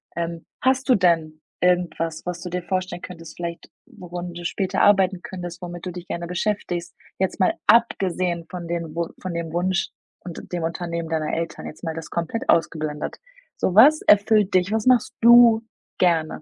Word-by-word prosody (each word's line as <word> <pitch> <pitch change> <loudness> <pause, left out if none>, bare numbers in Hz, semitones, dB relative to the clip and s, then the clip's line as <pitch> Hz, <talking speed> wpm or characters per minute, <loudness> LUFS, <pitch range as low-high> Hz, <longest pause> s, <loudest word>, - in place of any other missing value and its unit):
Ähm, 170 0 -4 0.2
hast 260 +1 +1
du 255 - +7
denn 165 -4 +1 0.2
irgendwas, 175 -3 0
was 175 -1 -4
du 180 - -6
dir 180 0 -3
vorstellen 185 -1 -3
könntest, 165 -3 -10
vielleicht 170 -1 -6 0.2
worin 175 0 -8
du 175 0 -8
später 190 +2 -1
arbeiten 190 -2 +4
könntest, 175 -2 -7
womit 175 0 -7
du 180 - -4
dich 180 0 -8
gerne 170 0 -4
beschäftigst? 180 -1 -2 0.3
Jetzt 190 +2 -1
mal 185 - +3
abgesehen 185 -6 +2
von 175 -2 -7
den 165 -2 -4
Wu 170 0 -1
von 185 -2 -4
dem 165 -1 -4
Wunsch 180 +2 0 0.3
und 175 -2 -10
dem 175 -2 -2
Unternehmen 170 0 -3
deiner 155 -2 -1
Eltern, 165 0 -4
jetzt 155 - -10
mal 160 - -2
das 160 -2 -7
komplett 170 +8 -3
ausgeblendet. 155 -2 0 0.4
So, 185 - 0
was 290 +8 +7
erfüllt 205 -1 +4
dich? 185 +1 +2
Was 220 -1 0
machst 250 -1 +4
du 235 -1 +7 0.4
gerne? 165 -4 +1
175 Hz, 175 wpm, -23 LUFS, 170-190 Hz, 0.4 s, du